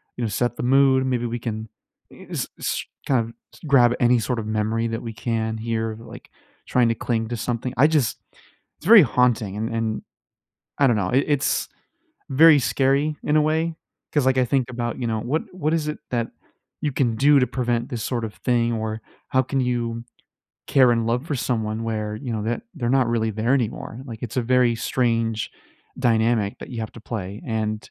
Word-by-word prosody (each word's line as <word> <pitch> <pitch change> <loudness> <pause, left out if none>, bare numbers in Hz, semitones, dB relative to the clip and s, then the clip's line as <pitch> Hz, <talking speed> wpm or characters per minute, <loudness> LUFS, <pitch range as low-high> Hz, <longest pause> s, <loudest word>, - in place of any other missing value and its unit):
you 125 - -4
know, 115 - 0
set 120 +4 -1
the - - -4
mood. 130 +1 +4
Maybe 125 -2 0
we 120 0 -3
can 110 -1 -4 0.5
eh - - -14
s - - -2
s - - -2 0.2
kind 130 -3 +2
of 115 0 -4 0.3
grab 125 -4 +5
any 120 0 +4
sort 120 +1 -1
of 110 - -5
memory 115 +2 0
that 115 0 -3
we 115 - -5
can 110 0 -2
hear," 110 -1 -2
like, 115 - -12 0.4
trying 125 -2 +3
to 115 - +1
cling 115 -2 0
to 120 - -3
something. 120 +2 -3
I 145 - +6
just 150 -6 +1 0.6
it's 165 - -8
very 215 -3 +10
haunting, 120 -6 +1
and 110 +2 -2
and 115 -1 -2 0.8
I 140 - +5
don't 120 -3 +3
know. 90 - -1
I 135 +2 +4
it's 140 - -1 0.6
very 150 +3 +7
scary 140 +4 +1
in 150 - +2
a 155 - +5
way 160 +2 0 0.4
'cause, 145 -3 +2
like, 130 0 +3
I 130 - +4
think 130 0 0
about, 120 -1 -3
you 120 - -1
know, 110 -1 -1
what 140 +9 -1
what 160 -4 -1
is 155 -2 0
it 150 - -4
that 120 -2 0 0.5
you 150 -2 0
can 120 -4 +1
do 145 +2 +5
to 125 - +2
prevent 120 0 0
this 120 -5 -4
sort 120 -3 -2
of 105 - -7
thing, 120 -1 +1
or 110 0 -3 0.3
how 130 - +3
can 135 +1 -2
you 120 -2 -2 0.6
care 130 -3 +5
and 115 -1 0
love 120 +5 -1
for 150 - -2
someone 110 -3 -2
where, 110 -1 -3
you 125 +1 -5
know, 110 -2 -2
that 115 +3 -2
they're 125 -8 -2
not 130 - +3
really 115 -1 0
there 110 +4 0
anymore? 120 -2 -2
Like, 115 -4 -9
it's 120 +1 -3
a - - +1
very 125 0 +3
strange 115 -2 0 0.5
dynamic 115 -4 +1
that - - -9
you 120 -3 -5
have 110 - -4
to 115 - -11
play, 100 -3 -5
and 110 -2 -1
120 Hz, 205 wpm, -23 LUFS, 115-130 Hz, 0.8 s, very